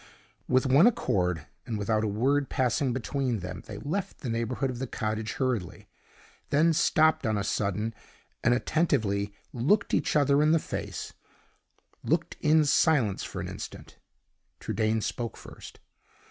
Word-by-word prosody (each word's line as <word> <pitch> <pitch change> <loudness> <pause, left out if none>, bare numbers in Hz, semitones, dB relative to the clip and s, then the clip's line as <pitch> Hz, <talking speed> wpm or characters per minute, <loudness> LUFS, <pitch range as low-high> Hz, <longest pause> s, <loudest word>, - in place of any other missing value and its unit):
With 130 +1 +3
one 140 - +6
accord, 90 - 0 0.2
and 110 - -2
without 110 +1 0
a - - +1
word 135 +7 +1
passing 130 +1 +1
between 130 -2 -2
them, 90 0 -6
they - - -7
left 190 +6 -4
the 125 - -3
neighborhood 115 +3 -1
of 120 - -7
the 135 - -3
cottage 110 0 -3
hurriedly; 120 -10 -2 0.6
then 160 +3 +4
stopped 155 0 +3
on 110 -3 0
a 100 - -1
sudden, 105 +3 -1 0.5
and 120 - +4
attentively 110 -10 0 0.2
looked 150 - +1
each - - +1
other 145 -1 +4
in 155 +1 +4
the - - +5
face - - -5 0.9
looked - - 0
in 155 0 +4
silence 140 - +2
for - - -5
an - - -4
instant. - - -9 0.6
Trudaine 110 0 0
spoke 115 +1 -4
first. - - -12
125 Hz, 145 wpm, -28 LUFS, 110-145 Hz, 0.9 s, one